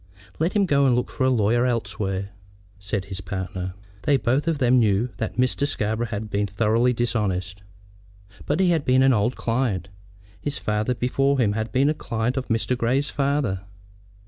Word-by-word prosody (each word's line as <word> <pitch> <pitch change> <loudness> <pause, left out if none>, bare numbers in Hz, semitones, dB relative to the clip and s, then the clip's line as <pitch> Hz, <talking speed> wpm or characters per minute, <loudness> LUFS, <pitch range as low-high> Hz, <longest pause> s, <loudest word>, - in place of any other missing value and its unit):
"Let 165 +3 +1
him 205 -2 +3
go 140 -5 +3
and 125 - +4
look 125 - -1
for 130 - 0
a - - +4
lawyer 120 +1 +2
elsewhere," 100 -4 -2 0.5
said 100 0 -3
his 95 -1 -7
partner. 95 -1 -5 0.3
They 145 -2 +3
both 130 +6 0
of 165 -2 +1
them 125 -2 +4
knew 110 +1 +2
that - - -3
Mr. 130 +3 +1
Scarborough 110 -1 -1
had 105 0 -4
been 100 0 -1
thoroughly 110 +5 +2
dishonest, 100 -6 -1 0.9
but - - 0
he 185 -2 +4
had 160 -4 +1
been 130 0 +4
an 135 -1 +5
old 115 +3 +1
client. 115 -7 -1 0.5
His 145 -1 -3
father 105 +4 -1
before 135 +3 +1
him 115 -6 +2
had 110 +1 -3
been 135 +2 +3
a 150 - +3
client 115 -3 -2
of 135 -1 -3
Mr. 115 +2 0
Grey's 130 +4 0
father. 140 -9 0
120 Hz, 180 wpm, -24 LUFS, 105-135 Hz, 0.9 s, an